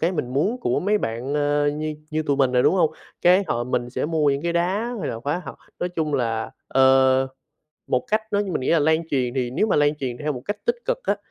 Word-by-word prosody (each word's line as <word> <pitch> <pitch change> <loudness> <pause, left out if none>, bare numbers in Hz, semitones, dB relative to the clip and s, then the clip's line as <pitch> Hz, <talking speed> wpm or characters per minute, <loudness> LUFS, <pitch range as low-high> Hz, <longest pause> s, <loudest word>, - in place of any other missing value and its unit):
cái 170 +3 +1
mình 125 -7 -3
muốn 195 - +1
của - - 0
mấy 210 +3 +2
bạn, 120 - -3
ờ, 145 0 +1
như 155 +1 -3 0.2
như 155 +1 -1
tụi 145 -2 0
mình 135 -2 +2
nè, 125 0 +3
đúng - - +4
hông? 160 -4 +3 0.3
Cái 185 +3 +5
họ 120 -4 -1
mình 120 -1 -2
sẽ - - -2
mua 155 -3 +2
những 140 +1 -1
cái 170 - 0
đá 195 +8 0
hay 150 - -2
là 115 - -5
khóa 145 +7 -2
học, - - -8 0.2
nói 175 - -1
chung 160 -4 -2
là, 115 -4 -1 0.2
ờ, 130 0 +4 0.6
một 125 -1 0
cách 215 +1 +2
nó 205 0 +2
mình 190 -8 -2
nghĩ 130 - -1
là 165 - +5
lan 160 +2 +1
truyền 125 -3 0
thì 125 -2 -1
nếu 170 - +1
mà 210 - +1
lan 145 0 +3
truyền 130 -5 -4
theo 150 0 -2
một 125 -1 -7
cách 205 +4 -5
tích 475 0 +1
cực - - 0
á, - - +1
145 Hz, 260 wpm, -23 LUFS, 130-175 Hz, 0.6 s, Cái